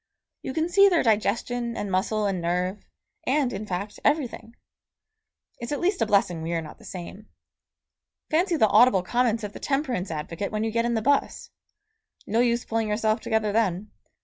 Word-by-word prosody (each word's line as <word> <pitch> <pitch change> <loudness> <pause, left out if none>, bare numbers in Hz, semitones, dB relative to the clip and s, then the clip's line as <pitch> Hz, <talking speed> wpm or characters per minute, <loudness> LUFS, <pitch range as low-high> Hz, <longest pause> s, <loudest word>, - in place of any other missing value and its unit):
You 260 - -5
can 320 +1 +1
see 395 +3 +6
their 350 -3 +2
digestion 235 +2 0
and 205 - -3
muscle 210 +3 0
and 190 -3 -1
nerve, 180 +4 -1 0.4
and, 265 -1 +1
in 205 +2 -5
fact, 195 +3 -4
everything. 235 -6 -1 1.0
It's 235 +2 -6
at 290 - -1
least 375 +1 0
a - - +2
blessing 195 -5 +2
we 165 +1 -3
are 165 - 0
not 155 - -11
the - - -15
same. 190 +3 -9 1.0
Fancy 345 +3 +2
the 220 -8 +4
audible 210 -3 +5
comments 230 +1 0
of 205 -1 -5
the - - -9
temperance 265 -9 -1
advocate 165 +5 -4
when 215 0 -1
you 225 - -1
get 230 +1 0
in 235 0 0
the 220 - -1
bus! 285 +3 0 0.7
No 225 +3 0
use 240 0 +2
pulling 225 -1 -1
yourself 215 +1 +1
together 220 -1 0
then. 210 -2 0
220 Hz, 180 wpm, -25 LUFS, 200-245 Hz, 1.0 s, see